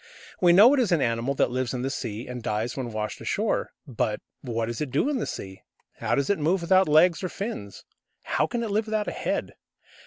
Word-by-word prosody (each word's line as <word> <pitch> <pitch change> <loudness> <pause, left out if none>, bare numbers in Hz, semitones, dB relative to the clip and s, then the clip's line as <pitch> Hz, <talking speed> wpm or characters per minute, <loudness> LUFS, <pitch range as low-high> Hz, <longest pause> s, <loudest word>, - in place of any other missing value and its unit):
We 175 -2 +5
know 210 +9 +8
it 285 - +3
is 235 -7 +1
an 170 - +4
animal 115 +4 0
that 125 - +2
lives 130 0 -2
in 125 - -3
the 135 - -1
sea, 115 -3 -4
and 125 -1 -6
dies 110 +2 -2
when 125 -3 -4
washed 105 -1 -4
ashore. - - -1 0.2
But - - -2 0.2
what 115 -2 -2
does 115 +3 -5
it 150 - -2
do 140 - +1
in 285 -3 0
the - - -2
sea? 95 0 -7 0.4
How - - 0
does 140 +6 +1
it 200 - 0
move 170 +5 +1
without 185 0 +4
legs 165 +4 +5
or 185 - -1
fins? 180 - -6 0.4
How 150 - 0
can 235 +7 -2
it 220 - -3
live 215 +2 0
without 215 -1 -1
a - - -1
head? - - -3
145 Hz, 235 wpm, -26 LUFS, 120-195 Hz, 0.4 s, know